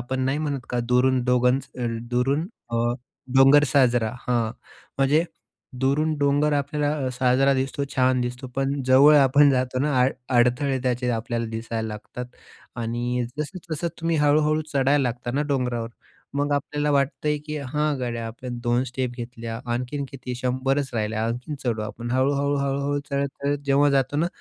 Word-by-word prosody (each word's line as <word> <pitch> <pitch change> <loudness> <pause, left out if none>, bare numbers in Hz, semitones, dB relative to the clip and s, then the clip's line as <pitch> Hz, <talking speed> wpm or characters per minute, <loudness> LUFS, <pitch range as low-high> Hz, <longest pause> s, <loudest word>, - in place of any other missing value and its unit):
आपण 130 +2 -3
नाही 135 +3 0
म्हणत 145 -3 -2
का, 125 - 0
दुरून 125 +1 +3
डोंगर 125 +1 +2
अ, 120 - -1 0.2
दुरून 135 +6 +1 0.3
अ, - - +1 0.6
डोंगर, 135 +2 +7
साजरा 125 -5 +3
हां, 120 -3 0 0.5
म्हणजे 145 +4 +3 0.6
दुरून 150 +4 +1
डोंगर 145 +1 +2
आपल्याला 145 +1 -1 0.2
अ, - - +1
साजरा 130 +2 +3
दिसतो 135 +1 -1
छान 130 -1 +3
दिसतो. 125 +1 -5
पण 135 +1 0
जवळ 135 +4 +7
आपण 140 +1 +6
जातो 130 -1 0
ना 145 -3 +1
अड 130 - +2 0.2
अडथळे 125 +3 +2
त्याचे 125 -1 0
आपल्याला 115 0 -2
दिसायला 115 0 -4
लागतात 110 +3 -7 0.5
आणि 120 +1 -2
जसं-जसं 170 +1 -4
तुम्ही 165 0 0
हळू-हळू 150 +1 +3
चढायला 140 +1 +3
लागता 120 -1 -2
ना 145 +3 +1
डोंगरावर 125 -3 -1 0.5
मग 145 +1 0
आपल्याला 145 +1 -1
वाटतंय 145 +2 +1
की, 150 0 -4
हा 150 +2 -1
गाड्या 120 -2 -3
आपण 120 +2 -7
2 120 +1 +2
स्टेप 130 0 -3
घेतल्या 115 -1 -6
आणखीन 125 +4 -2
किती 130 -2 -6
100च 130 +2 -1
राहिल्या, 110 0 -1
आणखीन 125 +6 -4
चढू 115 -3 0
आपण 115 +3 -6
हळू-हळू-हळू-हळू 140 +1 0
चढत-चढत 140 +1 -1
जेव्हा 140 +1 +4
जातो 140 +1 +1
ना, 160 +3 +2
130 Hz, 150 wpm, -24 LUFS, 125-145 Hz, 0.6 s, डोंगर